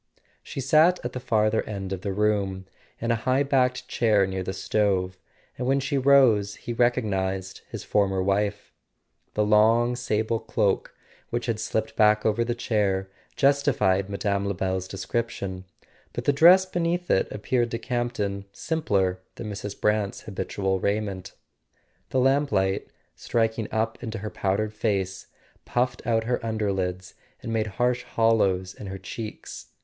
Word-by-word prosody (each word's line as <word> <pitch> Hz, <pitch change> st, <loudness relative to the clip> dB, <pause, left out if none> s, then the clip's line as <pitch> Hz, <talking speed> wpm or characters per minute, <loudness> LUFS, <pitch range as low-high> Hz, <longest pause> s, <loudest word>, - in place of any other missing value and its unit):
She 135 Hz, -, -6 dB
sat 155 Hz, +7 st, +4 dB
at 120 Hz, -, -3 dB
the 125 Hz, -, -4 dB
farther 110 Hz, -2 st, +2 dB
end 95 Hz, -2 st, -4 dB
of 95 Hz, -, -5 dB
the 100 Hz, -, -2 dB
room, 100 Hz, -2 st, 0 dB, 0.3 s
in 115 Hz, +1 st, -1 dB
a -, -, +3 dB
high 130 Hz, +4 st, +1 dB
backed 130 Hz, -3 st, +1 dB
chair 105 Hz, -4 st, +3 dB
near 95 Hz, 0 st, -3 dB
the 95 Hz, -, -3 dB
stove, 95 Hz, -2 st, 0 dB, 0.4 s
and 125 Hz, -, -2 dB
when 135 Hz, +1 st, +3 dB
she 135 Hz, +1 st, -2 dB
rose 130 Hz, -7 st, +4 dB
he 120 Hz, -, -6 dB
recognized 95 Hz, -6 st, 0 dB
his -, -, -6 dB
former 95 Hz, -2 st, +1 dB
wife. 100 Hz, +1 st, -1 dB, 0.6 s
The 105 Hz, -, +2 dB
long 115 Hz, +3 st, +4 dB
sable 115 Hz, -2 st, -1 dB
cloak, 110 Hz, -3 st, -1 dB, 0.3 s
which 120 Hz, 0 st, -2 dB
had 115 Hz, -3 st, -1 dB
slipped 110 Hz, 0 st, -2 dB
back 105 Hz, 0 st, +4 dB
over 110 Hz, +2 st, +2 dB
the 120 Hz, 0 st, -2 dB
chair, 100 Hz, -5 st, 0 dB, 0.2 s
justified 125 Hz, -9 st, +2 dB
Mme. 100 Hz, 0 st, -1 dB
Lebel's 95 Hz, -1 st, -2 dB
description, 95 Hz, -1 st, -4 dB, 0.5 s
but -, -, -4 dB
the 145 Hz, -, +4 dB
dress 175 Hz, +6 st, +7 dB
beneath 175 Hz, -1 st, -1 dB
it -, -, +2 dB
appeared 120 Hz, +3 st, 0 dB
to 115 Hz, -, -2 dB
Camp 120 Hz, 0 st, -2 dB
ton 100 Hz, -2 st, -3 dB
simpler 100 Hz, -, 0 dB, 0.2 s
than 105 Hz, -, -6 dB
Mrs. 100 Hz, 0 st, -6 dB
Brant's 105 Hz, -2 st, 0 dB
habitual 95 Hz, -1 st, -2 dB
raiment. 100 Hz, -2 st, -2 dB, 0.8 s
The 130 Hz, -, +1 dB
lamplight, 130 Hz, -8 st, +2 dB, 0.3 s
striking 115 Hz, -1 st, -1 dB
up 110 Hz, -1 st, -1 dB
into 115 Hz, -2 st, -4 dB
her 105 Hz, +1 st, -5 dB
powdered 105 Hz, +2 st, -1 dB
face, 95 Hz, -4 st, -2 dB, 0.4 s
puffed 125 Hz, +1 st, -1 dB
out 115 Hz, -1 st, +2 dB
her 125 Hz, +2 st, 0 dB
underlids 95 Hz, -5 st, -2 dB, 0.3 s
and 115 Hz, -, -3 dB
made 110 Hz, -1 st, 0 dB
harsh 125 Hz, 0 st, +2 dB
hollows 100 Hz, -5 st, +1 dB
in 100 Hz, -, -9 dB
her 95 Hz, 0 st, -5 dB
cheeks. 100 Hz, -, -8 dB
105 Hz, 150 wpm, -25 LUFS, 95-120 Hz, 0.8 s, dress